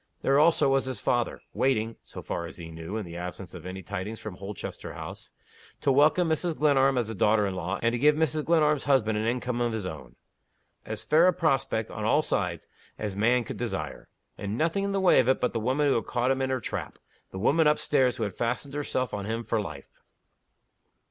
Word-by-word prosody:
There 135 +1 +4
also 160 -1 +4
was 135 0 +2
his 130 -5 -4
father, 120 -1 0
waiting 115 -4 +1
(so - - -10
far 85 - -3
as - - -11
he 85 -2 -8
knew, 80 +6 -6
in 110 - -4
the 85 -1 -9
absence 90 +1 -7
of 90 -1 -8
any 95 +1 -6
tidings 100 +4 -5
from 105 -4 -7
Holchester 100 0 -7
House) - - -9 0.5
to 140 - +3
welcome 150 +6 +4
Mrs. 160 +1 0
Glenarm 135 -3 +3
as 120 -3 0
a - - -4
daughter 105 +1 +3
in 95 - -2
law, 90 +2 -3
and 115 0 +2
to 120 - -1
give 150 +3 +5
Mrs. 155 -1 +1
Glenarm's 150 -3 +3
husband 130 -6 +3
an 110 - -1
income 125 0 -1
of 120 -1 0
his 110 -4 -3
own. 80 -5 -8 0.7
As 110 0 -4
fair 160 +4 +5
a 185 - +4
prospect, 135 -9 0
on 110 - -5
all 145 +8 +3
sides, 90 - -2 0.3
as 105 -3 -4
man 120 +4 +3
could - - -7
desire. - - -4 0.3
And 100 +2 -3
nothing 165 +6 +1
in 200 - -1
the 195 - 0
way 190 -2 +5
of 125 - +3
it 130 - +3
but 125 - 0
the 115 - -1
woman 130 +6 +1
who 140 - +4
had 115 - -1
caught 120 +1 +1
him 135 0 0
in 130 - 0
her 130 -1 0
trap 110 - -5 0.3
the - - -8
woman 150 +10 +3
up 150 - +4
stairs 130 -4 +2
who 120 - -3
had 105 -3 -2
fastened 125 +5 -2
herself 130 -4 -2
on 100 -1 -3
him 115 +1 -2
for 115 -1 0
life. 75 -8 -9
120 Hz, 225 wpm, -27 LUFS, 105-140 Hz, 0.7 s, give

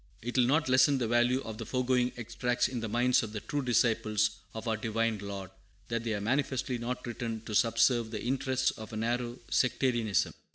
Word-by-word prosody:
It 120 +1 -4
will 125 -2 +5
not 150 +3 +2
lessen 130 +2 +5
the 120 -3 -1
value 120 +3 +3
of 110 -1 -7
the - - -4
foregoing 125 -1 +1
extracts 120 +1 0
in 125 - -4
the 115 -1 -4
minds 120 +3 +3
of 110 -2 -6
the 105 - -3
true 145 +7 -3
disciples 110 -4 +2 0.2
of 110 +1 -6
our 110 - +1
Divine 115 0 -1
Lord, 100 -2 -6 0.4
that 115 0 -1
they 115 -2 -1
are - - -2
manifestly 130 +1 -1
not 125 +2 -4
written 115 -2 -4
to 110 -1 -7
subserve 115 +1 +3
the 110 -1 -5
interests 130 +1 +1
of 110 - -10
a - - -3
narrow 120 +2 -1
sectarianism. 120 -5 +1
120 Hz, 200 wpm, -30 LUFS, 110-125 Hz, 0.4 s, will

